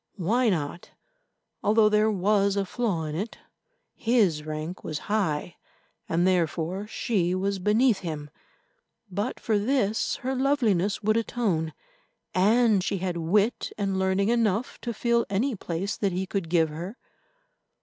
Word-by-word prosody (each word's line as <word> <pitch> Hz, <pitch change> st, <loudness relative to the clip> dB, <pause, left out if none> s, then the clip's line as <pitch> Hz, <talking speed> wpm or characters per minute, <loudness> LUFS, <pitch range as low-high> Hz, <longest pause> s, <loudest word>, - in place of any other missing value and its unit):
Why 225 Hz, +7 st, +2 dB
not? 165 Hz, -2 st, -3 dB, 0.7 s
Although 215 Hz, +1 st, +4 dB
there 210 Hz, +1 st, +3 dB
was 200 Hz, 0 st, +2 dB
a 200 Hz, -1 st, 0 dB
flaw 200 Hz, -6 st, -1 dB
in 155 Hz, -1 st, -4 dB
it, 200 Hz, +8 st, -4 dB, 0.6 s
his 210 Hz, -10 st, +2 dB
rank 155 Hz, +3 st, -5 dB
was 155 Hz, -, -3 dB
high, 180 Hz, -6 st, -1 dB, 0.5 s
and 170 Hz, +2 st, +2 dB
therefore 180 Hz, +2 st, 0 dB
she 190 Hz, -6 st, 0 dB
was 195 Hz, +1 st, -1 dB
beneath 215 Hz, +3 st, +3 dB
him; 150 Hz, -4 st, -6 dB, 0.8 s
but 200 Hz, +3 st, -2 dB
for 215 Hz, -2 st, +1 dB
this 220 Hz, -2 st, +1 dB
her 260 Hz, -, 0 dB
loveliness 230 Hz, -8 st, +1 dB
would 215 Hz, +2 st, +3 dB
atone, 200 Hz, -9 st, -1 dB, 0.6 s
and 210 Hz, +1 st, +4 dB
she 195 Hz, -, -1 dB
had 180 Hz, -1 st, -2 dB
wit 200 Hz, +7 st, +1 dB
and 195 Hz, -2 st, -1 dB
learning 190 Hz, +2 st, +1 dB
enough 230 Hz, 0 st, 0 dB
to 240 Hz, -, -3 dB
fill 235 Hz, +1 st, +1 dB
any 230 Hz, +6 st, 0 dB
place 185 Hz, +1 st, -3 dB
that 195 Hz, -3 st, 0 dB
he 185 Hz, +2 st, -1 dB
could 190 Hz, -3 st, -3 dB
give 165 Hz, -2 st, +3 dB
her. 175 Hz, +9 st, -7 dB
195 Hz, 140 wpm, -26 LUFS, 175-220 Hz, 0.8 s, Although